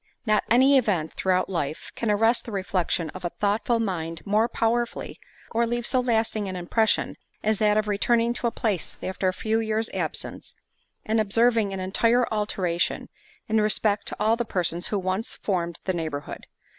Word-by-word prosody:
Not 215 -2 +3
any 265 +4 +6
event, 185 -10 -1
throughout 185 -1 +1
life, 155 -5 -3
can 230 - -2
arrest 225 +3 +3
the 230 - -7
reflection 185 -4 -1
of 185 - -10
a 175 - -1
thoughtful 210 +5 0
mind 165 -6 -3
more 215 +3 +2
powerfully, 235 +1 -1 0.3
or 235 +1 +1
leave 240 0 -2
so 255 - +2
lasting 225 -4 0
an 185 - -5
impression, 210 +5 +1 0.3
as 215 -1 +1
that 210 -1 +3
of 215 0 +1
returning 230 +3 +2
to 240 - -1
a - - 0
place 210 -9 -2
after 190 0 -1
a - - +3
few 220 +4 -1
years 220 0 -1
absence, - - -4 0.5
and 220 +1 +2
observing 225 0 +2
an 195 - -4
entire 230 +6 +2
alteration, 185 -5 -1 0.4
in 220 0 +2
respect 210 -1 +2
to - - -2
all 215 +2 +3
the 240 - -1
persons 175 -5 -1
who 210 - -1
once 190 +5 -2
formed 170 -4 -2
the 185 - 0
neighbourhood. 155 -4 -5
210 Hz, 175 wpm, -25 LUFS, 185-230 Hz, 0.5 s, any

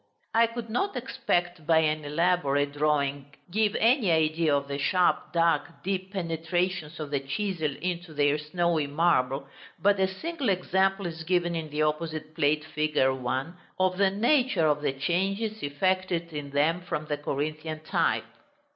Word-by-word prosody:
I 230 +1 +5
could 230 0 -6
not, 390 - -1
except 175 -3 -2
by 165 - +5
an 155 -1 +2
elaborate 145 -2 +1
drawing, 145 -1 0 0.2
give 215 +1 +1
any 235 -3 +3
idea 160 -1 +2
of 140 0 -1
the 140 0 -4
sharp, 175 +2 +2
dark, 165 -3 +1
deep 190 0 -2
penetrations 175 -2 -2
of 150 -2 -5
the 140 - +1
chisel 155 +1 -2
into 175 -1 -3
their 145 0 +2
snowy 160 0 0
marble, 140 -3 +1 0.3
but 200 0 +3
a 190 - +3
single 280 - -3
example 190 +1 +1
is 165 -1 -5
given 175 0 +1
in 160 -2 -4
the 150 +1 0
opposite 155 0 -2
plate, 150 0 +1
fig. 155 -1 -2
1, 130 +4 0 0.2
of 185 0 +1
the 200 -1 +5
nature 235 - +2
of 150 -1 +2
the 145 - +1
changes 195 +9 -1
effected 170 +3 -1
in 145 -1 -5
them 150 +5 +1
from 155 -3 -4
the 150 -1 -2
Corinthian 155 +2 -3
type. 155 - 0
165 Hz, 155 wpm, -27 LUFS, 150-185 Hz, 0.3 s, I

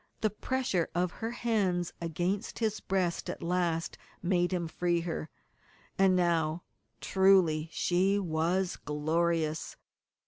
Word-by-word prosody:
The 215 - +2
pressure 210 -5 -1
of 175 0 +1
her 225 - -4
hands 205 -7 0
against 175 +6 -2
his 220 -2 0
breast 185 -3 -1
at - - -5
last 170 -1 -1 0.2
made 175 0 +2
him 175 -2 -1
free 170 +1 0
her. 165 -2 -4 0.7
And 190 -1 +4
now, 170 -2 +1 0.4
truly, 185 -5 +4
she 185 +5 +2
was 180 +1 0
glorious. 155 +1 -1
175 Hz, 115 wpm, -30 LUFS, 165-190 Hz, 0.7 s, And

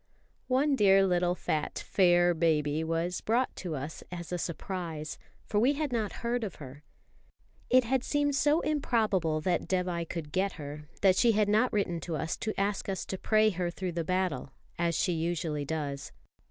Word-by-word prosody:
One 275 +3 +3
dear 195 -4 +5
little 180 -1 +2
fat 155 -4 -2
"fair" 175 -2 +3
baby 155 -2 +1
was 165 +2 -1
brought 240 +4 +1
to 175 -4 -4
us 145 +3 -6
as 175 -1 -6
a 180 - -2
surprise, 170 -3 -4 0.3
for 210 - 0
we 255 +6 +4
had 295 -1 -2
not 220 -3 0
heard 240 0 0
of 200 -5 -4
her. 140 0 -10 0.9
It 255 +1 +6
had 250 +2 0
seemed 290 0 +1
so 290 +5 +3
improbable 215 - +1
that 175 +1 0
Dévai 180 -3 -1
could 155 -3 -5
get 195 +2 0
her, 150 0 -8 0.2
that 190 -1 +5
she 235 -2 +5
had 210 -1 +2
not 215 +5 +3
written 185 -5 0
to 165 0 -4
us 160 +2 -2
to 215 -3 -3
ask 200 0 -1
us 190 - -3
to 190 - -4
pray 215 0 +3
her 180 -2 -2
through 180 +1 -4
the 170 0 -2
battle, 185 -4 -1 0.3
as 170 -1 +1
she 180 - +1
usually 160 -3 -2
does. 145 -2 -4
180 Hz, 180 wpm, -30 LUFS, 160-215 Hz, 0.9 s, It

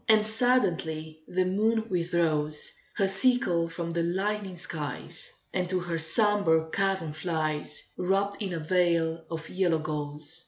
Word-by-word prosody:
And 215 -1 +6
suddenly 170 -10 +1
the 185 0 +1
moon 220 +4 +1
withdraws 165 -5 +1 0.2
Her 200 -3 +2
sickle 190 -4 +3
from 170 0 -4
the 170 0 0
lightening 190 +2 -1
skies, 170 - -3 0.2
And 180 -1 -1
to 185 0 0
her 175 -2 -3
sombre 160 -2 +2
cavern 190 -5 0
flies, 155 -2 -2 0.2
Wrapped 195 +3 0
in 195 -3 -2
a 170 - -2
veil 165 -1 +1
of 160 -1 -5
yellow 180 -3 +1
gauze. 150 0 -4
175 Hz, 135 wpm, -28 LUFS, 160-195 Hz, 0.2 s, And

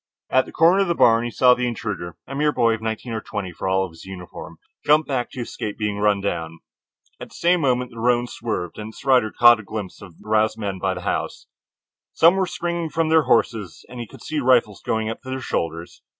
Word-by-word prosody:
At 130 - +3
the - - -10
corner 170 +4 +4
of 195 - +1
the 170 - 0
barn 115 -3 +4
he - - -2
saw 125 +2 +5
the 125 0 -1
intruder, 105 -8 -5
a 135 - -8
mere 150 +2 +1
boy 115 -5 +2
of 110 - -5
nineteen 110 +2 -4
or 110 - -3
twenty 100 -4 -5
for 90 - -5
all 95 0 +2
of 90 - -10
his 80 - -14
uniform 95 -2 -10 0.3
jump 150 +1 +4
back 125 -4 -2
to 125 - -7
escape 105 -3 -5
being 105 -2 -2
run 105 -1 +2
down. 85 -4 -3 0.6
At - - -9
the - - -16
same 175 0 +2
moment 125 -3 0
the 115 - -10
roan 120 +1 +2
swerved 110 -8 -5
and 105 +1 -6
its - - -14
rider 125 -5 +4
caught 120 -1 +6
a - - -9
glimpse 100 -2 -7
of 90 -5 -13
the - - -17
aroused 110 0 +2
men 100 -4 -4
by 95 0 -1
the 90 - -6
house. - - -3 0.7
Some 165 +3 +5
were 190 -1 +1
springing 170 -1 -3
from 160 +2 0
their 160 -1 +4
horses, 105 -6 0
and 125 - -9
he 120 - -5
could - - -14
see 155 -1 -2
the - - -3
rifles 120 -5 +3
going 110 0 -1
to 115 - -3
their 130 0 -4
shoulders. 85 -8 -4
115 Hz, 240 wpm, -22 LUFS, 100-130 Hz, 0.7 s, caught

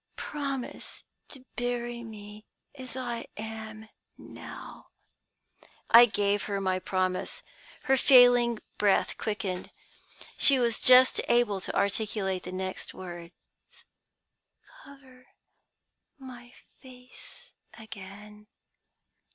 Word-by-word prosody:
Promise 275 -4 -6 0.3
to 265 -3 -13
bury 240 -1 -3
me 210 -1 -11 0.3
as 260 -3 -10
I 240 -2 -4
am 220 0 -8 0.3
now.' - - -11 1.0
"I 240 +1 +10
gave 205 -2 0
her 200 -1 -2
my 185 -1 0
promise. 185 0 -2 0.4
"Her 270 0 +3
failing 245 -3 +6 0.2
breath 205 -2 +2
quickened. 200 -4 -3 0.7
She 275 - +5
was 235 -2 0
just 255 0 +6
able 235 -5 +2
to - - -5
articulate 200 -2 -1
the 180 - -6
next 185 0 -5
words: 175 -2 -9 1.5
"'Cover 260 - -17 0.9
my 245 -3 -12 0.3
face 250 -1 -15 0.3
again.' 210 -1 -12
225 Hz, 95 wpm, -28 LUFS, 200-250 Hz, 1.5 s, I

